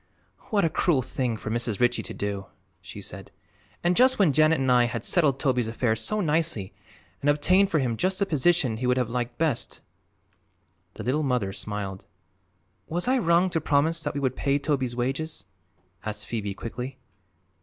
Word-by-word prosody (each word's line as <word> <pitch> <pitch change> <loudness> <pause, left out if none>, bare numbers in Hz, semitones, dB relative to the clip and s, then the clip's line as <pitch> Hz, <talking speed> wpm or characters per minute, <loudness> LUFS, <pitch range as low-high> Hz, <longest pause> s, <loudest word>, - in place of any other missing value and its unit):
"What 200 -5 +2
a - - +2
cruel 155 -6 +2
thing 125 -2 -2
for 110 - -5
Mrs. 115 -2 -1
Ritchie 120 0 +2
to - - -6
do!" 100 -1 -4 0.3
she - - -9
said. - - -8 0.5
"And 175 +1 +2
just 255 +3 +5
when 185 -9 +4
Janet 155 +1 +4
and 130 -1 +1
I 125 -1 +5
had 115 -2 -4
settled 150 -7 +4
Toby's 125 -5 +1
affairs 115 -1 0
so 215 - -1
nicely 155 - -1 0.5
and 145 - +2
obtained 185 +7 +4
for 165 - +1
him 125 -5 0
just 185 +6 0
the 200 - +2
position 155 - +2
he 125 +2 -2
would 125 0 +2
have 125 -3 0
liked 120 0 -3
best." 155 -7 -1 1.1
The - - -7
Little 135 +5 0
Mother 125 -9 0
smiled. 100 -2 -4 0.8
"Was 175 +5 -2
I 260 +1 +3
wrong 175 -1 +3
to 165 - 0
promise 155 +3 +1
that 145 -2 -3
we - - -1
would 130 -2 -1
pay 140 0 +1
Toby's 135 -4 -1
wages?" 135 0 -3 0.6
asked 105 +1 -3
Phoebe 105 -4 -4
quickly. 125 +5 -6
135 Hz, 180 wpm, -26 LUFS, 120-165 Hz, 1.1 s, just